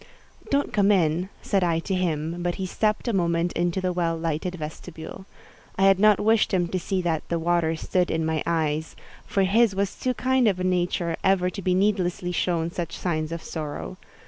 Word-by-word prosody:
"Don't 280 Hz, -3 st, 0 dB
come 205 Hz, -2 st, +4 dB
in," 175 Hz, -1 st, +2 dB
said 195 Hz, -2 st, +1 dB
I 170 Hz, -2 st, +2 dB
to 190 Hz, -, -3 dB
him; 170 Hz, -2 st, -1 dB
but 175 Hz, 0 st, -1 dB
he 190 Hz, -, -3 dB
stepped 215 Hz, +5 st, -1 dB
a 235 Hz, -, +1 dB
moment 170 Hz, -2 st, +1 dB
into 175 Hz, +1 st, 0 dB
the 185 Hz, -1 st, -1 dB
well 170 Hz, -2 st, 0 dB
lighted 165 Hz, +2 st, -2 dB
vestibule. 160 Hz, +3 st, -8 dB, 0.5 s
I 195 Hz, -, 0 dB
had 195 Hz, -1 st, +5 dB
not 210 Hz, 0 st, +5 dB
wished 220 Hz, 0 st, +3 dB
him 180 Hz, -2 st, +1 dB
to 185 Hz, -, -1 dB
see 185 Hz, +1 st, -2 dB
that 165 Hz, -3 st, -1 dB
"the 170 Hz, -, 0 dB
water 165 Hz, -1 st, +1 dB
stood 180 Hz, +2 st, 0 dB
in 160 Hz, 0 st, 0 dB
my 160 Hz, -1 st, 0 dB
eyes," 160 Hz, -1 st, -1 dB, 0.3 s
for 195 Hz, -, +1 dB
his 205 Hz, +2 st, +3 dB
was 200 Hz, 0 st, 0 dB
too 255 Hz, -1 st, -2 dB
kind 260 Hz, -1 st, +2 dB
a 185 Hz, -3 st, +1 dB
nature 175 Hz, -2 st, 0 dB
ever 185 Hz, -1 st, +2 dB
to 195 Hz, -, -6 dB
be 180 Hz, 0 st, +1 dB
needlessly 185 Hz, -3 st, 0 dB
shown 170 Hz, -1 st, 0 dB
such 170 Hz, -2 st, -4 dB
signs 155 Hz, -3 st, -2 dB
of 165 Hz, -1 st, -5 dB
sorrow. 150 Hz, -, -5 dB
180 Hz, 200 wpm, -25 LUFS, 165-195 Hz, 0.5 s, had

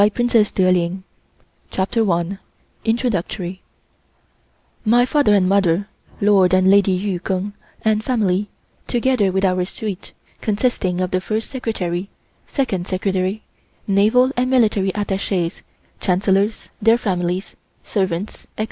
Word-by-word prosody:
CONCLUSION 215 Hz, +1 st, +3 dB
TWO 190 Hz, -, +3 dB
YEARS 185 Hz, 0 st, +4 dB
IN 175 Hz, +2 st, -2 dB, 0.7 s
THE 190 Hz, -, 0 dB
FORBIDDEN 205 Hz, +3 st, -1 dB
CITY 185 Hz, -1 st, -6 dB, 1.2 s
MY 240 Hz, +2 st, +4 dB
father 280 Hz, -6 st, +3 dB
and 185 Hz, -2 st, +3 dB
mother, 195 Hz, 0 st, +2 dB, 0.3 s
Lord 195 Hz, -3 st, +4 dB
and 185 Hz, +1 st, +4 dB
Lady 200 Hz, -1 st, +4 dB
Yu 185 Hz, 0 st, -1 dB
Keng, 190 Hz, +3 st, -3 dB, 0.3 s
and 220 Hz, -1 st, +2 dB
family, 205 Hz, -5 st, 0 dB, 0.4 s
together 240 Hz, -5 st, +1 dB
with 190 Hz, +1 st, +1 dB
our 185 Hz, -1 st, +2 dB
suite 200 Hz, +1 st, -6 dB, 0.3 s
consisting 205 Hz, -5 st, 0 dB
of 185 Hz, -, -1 dB
the 185 Hz, -, 0 dB
First 215 Hz, +3 st, -3 dB
Secretary, 195 Hz, -8 st, -3 dB, 0.4 s
Second 195 Hz, -10 st, -2 dB
Secretary, 190 Hz, +2 st, -1 dB, 0.4 s
Naval 220 Hz, +6 st, +3 dB
and 250 Hz, +1 st, +1 dB
Military 215 Hz, -6 st, +3 dB
Attaches, 195 Hz, -3 st, -2 dB, 0.4 s
Chancellors, 195 Hz, +3 st, +1 dB
their 225 Hz, +2 st, +5 dB
families, 180 Hz, -3 st, -2 dB, 0.3 s
servants, 190 Hz, -1 st, -2 dB
etc. -, -, -12 dB
200 Hz, 120 wpm, -20 LUFS, 185-220 Hz, 1.2 s, their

